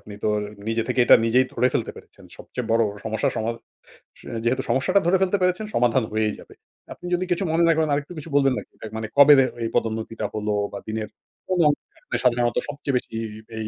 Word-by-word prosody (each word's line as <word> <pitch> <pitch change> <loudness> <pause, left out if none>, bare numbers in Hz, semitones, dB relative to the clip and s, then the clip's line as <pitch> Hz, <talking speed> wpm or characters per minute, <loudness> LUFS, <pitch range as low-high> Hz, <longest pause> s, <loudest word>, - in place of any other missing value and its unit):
আপনি 105 - -11
তো - - +1 0.4
নিজে 115 0 0
থেকে 125 0 +1
এটা - - +8
নিজেই 125 +3 +4
ধরে 125 - +2
ফেলতে - - 0
পেরেছেন। - - -15
সবচেয়ে 125 -2 -6
বড় 115 +1 +4 0.2
সমস্যা 110 -1 0
সমাধা 115 +1 -2 0.9
যেহেতু 130 +3 0
সমস্যাটা 135 +9 +3
ধরে 185 +2 +4
ফেলতে 190 +1 +2
পেরেছেন 180 +3 +1
সমাধান 120 +1 +3
হয়েই 110 0 0
যাবে। - - -14 0.4
আপনি - - -14
যদি 180 +1 +1
কিছু 175 +3 +1
মনে 165 +1 +2
না - - +5
করেন 160 -1 +1
আরেকটু 145 +4 -3
কিছু 155 - -9
বলবেন 135 -2 +4
নাকি - - -8 0.3
মানে 110 0 -4
কবে 145 +1 +9 0.3
এই 115 - -1
পদোন্নতিটা 110 0 -2
হলো 105 0 -2 0.2
বা 100 - -5
দিনের 110 0 -3 0.4
কোন 185 -1 0
অংশতে 145 - -4
সাধারণত 120 -1 +2
সবচেয়ে 140 -2 -3
বেশি - - -6 0.5
এই 110 -1 -3
125 Hz, 195 wpm, -23 LUFS, 110-155 Hz, 0.9 s, কবে